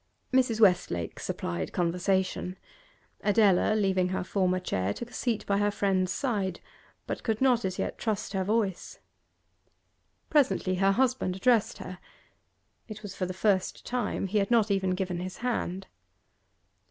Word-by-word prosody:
Mrs. 250 -4 +3
Westlake 180 - +2
supplied 85 -2 -4
conversation. 180 +1 0 0.7
Adela, 210 -1 +4
leaving 190 -3 +2
her 185 0 -2
former 185 -1 +1
chair, 95 - -2
took 240 0 -7
a - - -16
seat 235 -4 -1
by 200 0 +1
her 205 0 +2
friend's 190 -2 0
side, 205 - -1 0.5
but - - -4
could 220 -2 -1
not 250 -3 +3
as 185 -1 -2
yet - - -3
trust 215 -3 -2
her 190 -1 0
voice. 205 -2 -1 1.3
Presently 270 -10 +2
her 195 0 +4
husband 255 -6 +1
addressed 225 +2 +2
her; 185 0 -8 0.9
it 215 -1 -9
was 200 -2 -6
for 185 - -2
the - - -4
first 190 0 0
time; 245 -5 -2
he 205 +2 +1
had 195 - 0
not 225 -3 +3
even 190 -2 +1
given 180 -2 -2
his 185 +1 -6
hand. 195 -6 -2
195 Hz, 150 wpm, -28 LUFS, 185-220 Hz, 1.3 s, Adela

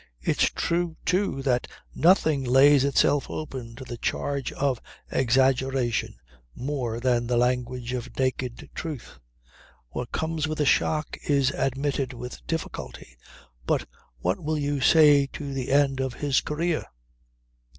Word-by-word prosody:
It's - - +2
true 170 -1 -1
too 180 -6 0
that 125 -3 +1 0.3
nothing 155 -5 +3
lays 135 +2 +6
itself 140 0 +2
open 130 -6 -6
to 130 - -9
the 120 -1 -6
charge 140 +3 -2
of 135 -4 0 0.3
exaggeration 130 -1 +1 0.4
more 125 -4 -3
than 120 -1 +1
the 120 0 +1
language 125 0 0
of 125 -1 -5
naked 130 -2 -2
truth. 155 -7 -7 0.7
What 120 - -5
comes 160 -1 -1
with 155 0 -4
a 150 - +2
shock 155 +2 +1
is 140 -2 +3
admitted 135 -1 -1
with 125 +1 -8
difficulty. 65 - -5 0.5
But - - +1 0.3
what 90 +10 -1
will 155 +1 0
you 145 -1 -1
say 145 -1 +6
to 140 -2 -5
the 130 -1 -3
end 140 -1 +3
of 130 -2 -2
his 145 -3 +1
career? 165 +2 -1
135 Hz, 135 wpm, -26 LUFS, 125-145 Hz, 0.7 s, lays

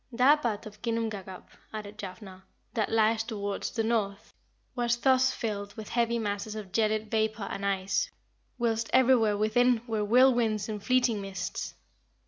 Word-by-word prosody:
"That 265 +5 +4
part 230 -3 -2
of 210 -1 -11
Ginnungagap," 220 -5 -3 0.2
added 210 -1 -7
Jafnhar, 190 -1 -8 0.3
"that 220 -4 -1
lies 225 0 +3
towards 205 -3 -3
the 225 - -2
north 210 -3 -1 0.4
was 240 -2 0
thus 260 +1 +4
filled 205 -4 -4
with 215 -1 -7
heavy 235 0 +1
masses 210 -1 -3
of 210 -4 -7
gelid 215 0 0
vapour 220 -1 0
and 200 - -5
ice, 195 -1 0 0.5
whilst 230 -2 0
everywhere 235 -5 +4
within 230 +2 +3
were 220 -3 -1
whirlwinds 235 -2 +3
and 210 -2 -5
fleeting 245 -4 +2
mists. 195 -1 -5
220 Hz, 145 wpm, -29 LUFS, 205-235 Hz, 0.5 s, That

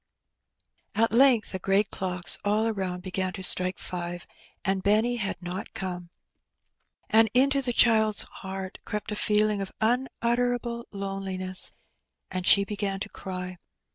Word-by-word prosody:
At 230 +1 +2
length 240 -2 +4
the 190 - -4
great 195 +2 +1
clocks 180 -2 0
all 210 +2 +1
around 190 -5 -3
began 185 0 -3
to 190 -2 -7
strike 185 0 +4
five, 175 -1 -6 0.4
and 195 0 0
Benny 220 +5 +2
had 195 -4 -3
not 180 +2 -6
come; 180 -2 -5 1.0
and 225 0 +4
into 275 +2 +3
the 250 -2 -2
child's 220 -3 +4
heart 190 0 -8
crept 210 0 -5
a - - -2
feeling 210 -1 +1
of 195 - -5
unutterable 240 0 -1
loneliness, 195 -2 +2 0.6
and 185 -1 -3
she 200 - +6
began 200 -1 -3
to 210 - -4
cry. 185 -2 -7
200 Hz, 140 wpm, -26 LUFS, 185-225 Hz, 1.0 s, she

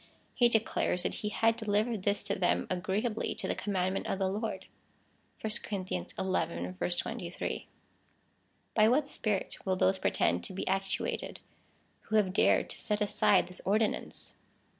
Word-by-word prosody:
He 240 -1 +5
declares 220 -5 +1
that - - -1
he 210 - -1
had 225 +2 +3
deli 210 -2 +2
vered 225 -4 -3
this 200 +1 +1
to - - -1
them 180 -1 +1
agreeably 200 +5 -1
to - - -4
the - - +1
commandment 190 -1 -1
of - - -1
the 190 -1 +1
Lord, 215 +3 -3 0.8
(verse 220 +1 0
23.) 175 - -2 1.1
By 215 0 +5
what 275 +4 +3
spirit 210 -8 -1
will 190 -1 +1
those 190 +1 +2
pretend - - +1
to - - -7
be 190 - -4
actuated, 195 +1 -1 0.7
who 220 - +1
have 200 -4 +3
dared - - +4
to - - -7
set 210 -1 -1
aside 205 -2 +3
this 180 - -5
ordinance 215 +2 0
200 Hz, 145 wpm, -31 LUFS, 185-220 Hz, 1.1 s, He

